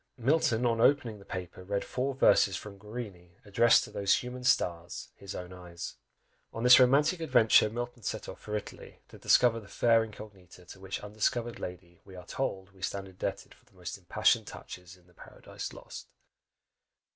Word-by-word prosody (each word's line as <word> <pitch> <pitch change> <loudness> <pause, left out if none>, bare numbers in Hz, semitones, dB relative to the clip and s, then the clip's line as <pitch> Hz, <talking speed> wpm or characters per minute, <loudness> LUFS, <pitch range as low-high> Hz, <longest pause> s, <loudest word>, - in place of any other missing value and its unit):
Milton 125 -2 +2
on 115 -1 +1
opening 120 -6 +3
the 100 - -15
paper 90 -1 -7
read 100 +1 -2
four 135 +1 -2
verses 100 -7 +4
from 100 -2 -10
Guarini, 100 -5 -9
addressed 115 +4 +4
to 110 - -9
those 100 -1 +2
"human 125 0 -5
stars," 85 -8 0
his 100 0 -9
own 90 0 -7
eyes! 90 -2 -8 0.5
On 115 - -5
this 125 +1 +9
romantic 140 +7 +4
adventure, 120 -8 +4
Milton 120 +2 -5
set - - -4
off - - -9
for 105 - -5
Italy, 105 - -8
to - - -14
discover 120 -2 +4
the 105 - -14
fair 115 +1 +3
"incognita," 100 -5 -12
to 95 - -12
which 95 0 -5
undiscovered 115 +3 -2
lady 90 -1 -8
we 95 -1 -14
are 90 -1 -10
told 95 -5 -4
we 95 -1 -21
stand 95 +1 -3
indebted 95 -1 -5
for - - -27
the - - -28
most - - -6
impassioned - - +1
touches 90 +1 -10
in 90 - -25
the 90 - -24
Paradise - - -9
Lost! - - -10
105 Hz, 180 wpm, -30 LUFS, 95-120 Hz, 0.5 s, this